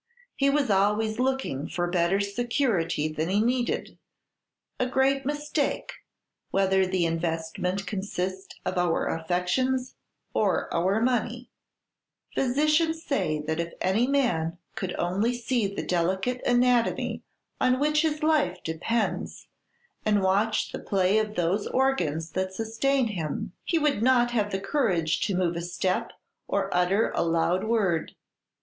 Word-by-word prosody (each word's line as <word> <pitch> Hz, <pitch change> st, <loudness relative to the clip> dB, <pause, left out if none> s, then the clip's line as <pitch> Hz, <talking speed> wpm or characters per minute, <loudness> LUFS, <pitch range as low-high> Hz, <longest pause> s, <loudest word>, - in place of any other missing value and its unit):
He 275 Hz, 0 st, +2 dB
was 275 Hz, -5 st, +2 dB
always 210 Hz, +3 st, +2 dB
looking 255 Hz, -, -1 dB
for 175 Hz, -, -1 dB
better 175 Hz, +2 st, +1 dB
security 200 Hz, -, 0 dB
than 155 Hz, +2 st, -2 dB
he 200 Hz, +2 st, +2 dB
needed, 245 Hz, +2 st, -1 dB, 0.8 s
a 255 Hz, -, +1 dB
great 265 Hz, +1 st, +1 dB
mistake, 295 Hz, 0 st, -1 dB, 0.6 s
whether 190 Hz, -1 st, +2 dB
the 185 Hz, -2 st, +1 dB
investment 165 Hz, +3 st, -2 dB
consist 190 Hz, -1 st, -4 dB
of 185 Hz, -, -1 dB
our 175 Hz, -2 st, +1 dB
affections 180 Hz, +11 st, 0 dB, 0.4 s
or 200 Hz, -4 st, +1 dB
our 190 Hz, +6 st, +1 dB
money. 245 Hz, 0 st, -1 dB, 0.8 s
Physicians 305 Hz, +5 st, +2 dB
say 175 Hz, -, 0 dB
that 160 Hz, +1 st, -2 dB
if 170 Hz, 0 st, -3 dB
any 210 Hz, +7 st, +2 dB
man 205 Hz, -13 st, +1 dB, 0.2 s
could 185 Hz, -2 st, -4 dB
only 200 Hz, +8 st, 0 dB
see 240 Hz, -2 st, 0 dB
the 200 Hz, -, -5 dB
delicate 190 Hz, +8 st, 0 dB
anatomy 245 Hz, -1 st, +2 dB, 0.4 s
on 255 Hz, 0 st, +3 dB
which 300 Hz, +1 st, +3 dB
his 305 Hz, -1 st, -1 dB
life 300 Hz, -, +2 dB
depends, 210 Hz, +8 st, -2 dB, 0.5 s
and 210 Hz, -2 st, +2 dB
watch 205 Hz, +3 st, +1 dB
the -, -, -5 dB
play 195 Hz, +1 st, +2 dB
of 215 Hz, -1 st, -2 dB
those 180 Hz, +4 st, 0 dB
organs 165 Hz, -, 0 dB
that 190 Hz, +1 st, -2 dB
sustain 230 Hz, +4 st, 0 dB
him, 170 Hz, -4 st, -4 dB
he 335 Hz, -, +1 dB
would 295 Hz, -8 st, +1 dB
not 240 Hz, 0 st, +4 dB
have 210 Hz, -4 st, +1 dB
courage 185 Hz, -, +1 dB
to 200 Hz, -, -1 dB
move 175 Hz, -2 st, +1 dB
a 170 Hz, -, -3 dB
step 180 Hz, +1 st, -1 dB, 0.4 s
or -, -, -1 dB
utter 180 Hz, +5 st, +2 dB
a -, -, 0 dB
loud 170 Hz, +3 st, +1 dB
word. 200 Hz, -8 st, 0 dB
200 Hz, 135 wpm, -27 LUFS, 180-250 Hz, 0.8 s, not